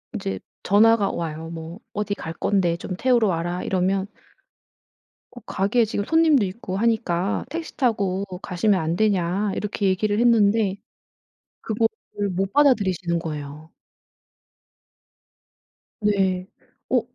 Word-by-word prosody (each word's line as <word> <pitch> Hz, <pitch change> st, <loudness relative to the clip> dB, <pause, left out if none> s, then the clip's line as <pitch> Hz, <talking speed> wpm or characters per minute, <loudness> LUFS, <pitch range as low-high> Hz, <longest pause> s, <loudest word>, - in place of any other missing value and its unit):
이제 95 Hz, -1 st, -3 dB, 0.2 s
전화가 210 Hz, +1 st, +4 dB
와요. 165 Hz, -1 st, -5 dB
뭐 165 Hz, +4 st, -8 dB
"어디 210 Hz, -1 st, -2 dB
갈 160 Hz, -, -6 dB
건데 175 Hz, -2 st, +1 dB
좀 185 Hz, +1 st, -5 dB
태우러 245 Hz, -4 st, +3 dB
와라." 175 Hz, +1 st, -2 dB
이러면 190 Hz, +1 st, 0 dB, 1.2 s
"어 245 Hz, -, -12 dB
가게에 205 Hz, +5 st, +1 dB
지금 205 Hz, -2 st, -2 dB
손님도 320 Hz, -6 st, +4 dB
있고 185 Hz, -1 st, -5 dB
하니까 200 Hz, -4 st, 0 dB
택시 330 Hz, +1 st, -6 dB
타고 200 Hz, -7 st, 0 dB, 0.2 s
가시면 185 Hz, +2 st, +1 dB
안 160 Hz, +1 st, -1 dB
되냐." 200 Hz, -1 st, +1 dB
이렇게 210 Hz, -1 st, -2 dB
얘기를 205 Hz, +2 st, +1 dB
했는데 220 Hz, -4 st, +3 dB, 0.9 s
그거를 220 Hz, -2 st, -2 dB
못 190 Hz, +2 st, -2 dB
받아들이시는 190 Hz, -, +2 dB
거예요. 150 Hz, -1 st, -7 dB, 2.3 s
네. 190 Hz, -3 st, +1 dB, 0.4 s
"어 -, -, +4 dB
195 Hz, 245 characters per minute, -23 LUFS, 175-220 Hz, 2.3 s, 전화가